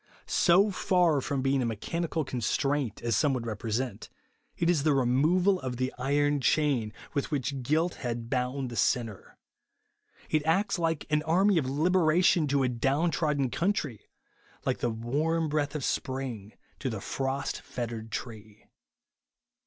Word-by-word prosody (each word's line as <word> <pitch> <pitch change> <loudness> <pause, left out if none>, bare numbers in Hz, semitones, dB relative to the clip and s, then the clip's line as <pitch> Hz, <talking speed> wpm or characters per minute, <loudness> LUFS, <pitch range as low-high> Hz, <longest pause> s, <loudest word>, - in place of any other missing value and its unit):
So 195 +4 +4
far 180 -6 +2
from 135 0 -2
being 135 0 +2
a - - 0
mechanical 160 - -2
constraint, 130 0 -1
as 115 -2 +1
some 145 -4 +2
would 120 -2 -4
represent, 115 +3 -3 0.5
it 170 - +1
is 170 -4 +3
the 150 -1 +2
removal 155 +10 +3
of 125 -2 -4
the 130 +1 -1
iron 145 +2 +1
chain 135 -7 +1 0.2
with 140 - -1
which 140 -2 -2
guilt 160 +7 +1
had 120 -2 -3
bound 125 +1 -2
the - - -6
sinner. 115 -1 -1 0.9
It 155 -1 +1
acts 190 +5 +1
like 165 -2 0
an 150 0 +3
army 180 +4 +3
of 130 -4 -2
liberation 165 +2 +3
to 140 -1 +2
a - - +2
down 135 +7 +1
trodden 150 -6 0
country; 170 - -2 0.6
like - - 0
the 120 - 0
warm 150 +9 -1
breath 145 0 -1
of 150 - -3
sjDring 125 -8 -3 0.3
to 135 - -2
the 110 -3 -4
frost 135 +6 -3
fettered 115 -2 -6
tree. 110 -3 -7
140 Hz, 150 wpm, -28 LUFS, 120-160 Hz, 0.9 s, So